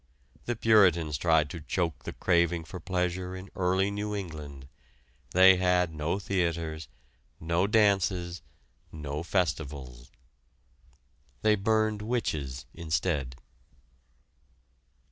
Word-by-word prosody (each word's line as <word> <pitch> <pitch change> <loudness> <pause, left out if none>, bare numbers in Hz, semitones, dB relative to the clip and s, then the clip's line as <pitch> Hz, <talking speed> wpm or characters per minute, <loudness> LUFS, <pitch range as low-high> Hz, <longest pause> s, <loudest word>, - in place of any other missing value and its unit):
The 120 - -1
Puritans 95 -9 +4
tried 80 -2 +3
to 85 - -7
choke 85 +1 -2
the - - -5
craving 85 -2 +1
for 90 +3 -8
pleasure 90 0 -2
in 95 +1 -9
early 95 +2 +1
New 105 +1 -3
England. 75 -8 -7 0.6
They 95 +1 +7
had 90 -2 +2
no 75 +4 -1
theaters, 85 -5 -2 0.5
no 85 +4 +1
dances, 95 -5 +2 0.5
no 75 -1 -5
festivals. 75 -9 -3 1.3
They 110 0 +5
burned 110 +1 +1
witches 75 - -3
instead. 80 -5 -2
90 Hz, 100 wpm, -28 LUFS, 80-95 Hz, 1.3 s, They